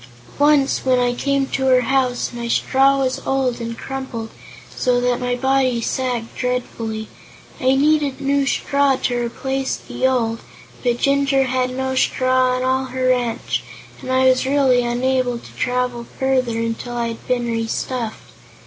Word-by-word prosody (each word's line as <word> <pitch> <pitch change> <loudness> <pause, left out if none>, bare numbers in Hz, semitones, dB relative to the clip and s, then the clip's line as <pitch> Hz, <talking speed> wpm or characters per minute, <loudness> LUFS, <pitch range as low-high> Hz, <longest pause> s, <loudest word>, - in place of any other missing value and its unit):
"Once, 290 -1 +3
when 255 -1 +3
I 245 0 +2
came 275 +2 0
to 265 -1 -1
her 255 -1 +5
house, 255 0 0
my 235 0 -4
straw 270 +3 +3
was 260 -1 0
old 260 -3 0
and 230 0 -5
crumpled, 260 -4 -6 0.4
so 250 -2 +2
that 245 0 +1
my 245 0 -1
body 260 -1 +1
sagged 240 -1 -2
dreadfully. 230 -3 -3 0.5
I 260 +1 +3
needed 290 -1 +2
new 280 0 +1
straw 280 0 +2
to 255 -1 -1
replace 265 +3 -2
the 260 - -2
old, 230 -3 0 0.4
but 240 -1 +1
Jinjur 275 0 +2
had 255 0 0
no 260 +1 -2
straw 255 0 +2
on 255 - -2
all 260 +1 +1
her 255 0 -1
ranch 245 -2 0 0.4
and 255 - -5
I 260 0 +3
was 255 0 +4
really 270 -3 +3
unable 245 +1 0
to - - -13
travel 250 -1 -1
farther 255 -3 +1
until 230 +1 -3
I 235 -1 -1
had 230 - -9
been 245 -1 0
restuffed. 230 0 -3
255 Hz, 155 wpm, -20 LUFS, 245-265 Hz, 0.5 s, her